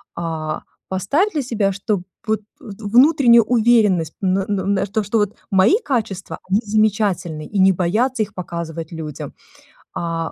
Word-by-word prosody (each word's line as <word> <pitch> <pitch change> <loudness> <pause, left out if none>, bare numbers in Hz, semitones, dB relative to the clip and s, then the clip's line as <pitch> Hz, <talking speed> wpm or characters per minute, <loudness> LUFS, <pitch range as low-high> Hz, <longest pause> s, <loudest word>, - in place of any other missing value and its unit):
А, 160 -2 -4 0.3
поставь 240 - +1
для 300 - 0
себя, 225 -6 0
что 200 0 -2 0.3
вот 220 0 0 0.2
вт 220 -7 -11
внутреннюю 245 -3 +6
уверенность, 215 -9 +3
м, 185 -2 +1
на, 195 0 0
на 195 -1 0
то, 210 +2 -2
что 205 +3 -1
вот 205 0 -1 0.2
мои 195 - +5
качества, 215 - -3
они 200 +3 +2
замечательны, 205 -7 0
и 210 - -5
не 190 0 +6
бояться 220 +8 0
их 205 - -9
показывать 170 -2 -6
людям. 155 -3 -7 0.6
А, 165 -1 -3
195 Hz, 150 wpm, -20 LUFS, 175-225 Hz, 0.6 s, внутреннюю